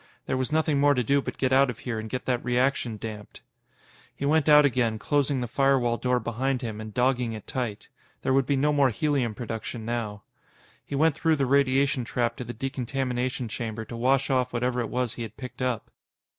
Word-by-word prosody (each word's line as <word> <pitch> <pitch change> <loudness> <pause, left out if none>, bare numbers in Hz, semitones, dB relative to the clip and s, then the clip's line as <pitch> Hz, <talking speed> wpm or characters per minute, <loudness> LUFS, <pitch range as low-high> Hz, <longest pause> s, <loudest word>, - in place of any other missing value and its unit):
There - - -1
was 130 +2 -2
nothing 155 -2 +2
more 145 0 +4
to 125 - +1
do 140 +5 +2
but - - -6
get 130 -1 +1
out 135 0 +5
of 120 - -4
here 115 -3 -4
and 110 0 -6
get 130 +1 -4
that 125 -2 0
reaction 125 -2 0
damped. 105 -1 -8 0.7
He 140 - -3
went 155 +1 +3
out 150 0 +8
again, 120 -5 +1
closing 140 +2 0
the 120 - -2
firewall 130 -2 +2
door 125 0 +1
behind 130 +3 -2
him 110 -2 -4
and 110 0 -7
dogging 125 0 +1
it 110 -2 -8
tight. 120 -7 -4 0.4
There 130 - +2
would 135 -1 +3
be 140 - +2
no 150 +2 +2
more 140 -2 +4
helium 130 -3 0
production 115 0 -5
now. 110 -3 -3 0.6
He 140 - -5
went 155 +2 +4
through 160 +2 +2
the 140 -2 +1
radiation 135 -1 +2
trap 120 0 -1
to - - -4
the 120 - -6
decontamination 130 0 -2
chamber 110 0 -5
to 120 - -8
wash 135 +3 +2
off 125 -2 +1
whatever 125 +1 0
it 115 - -2
was 125 -2 -1
he - - -8
had 115 - -7
picked 125 0 -8
up. 125 -4 -2
125 Hz, 210 wpm, -26 LUFS, 115-135 Hz, 0.7 s, out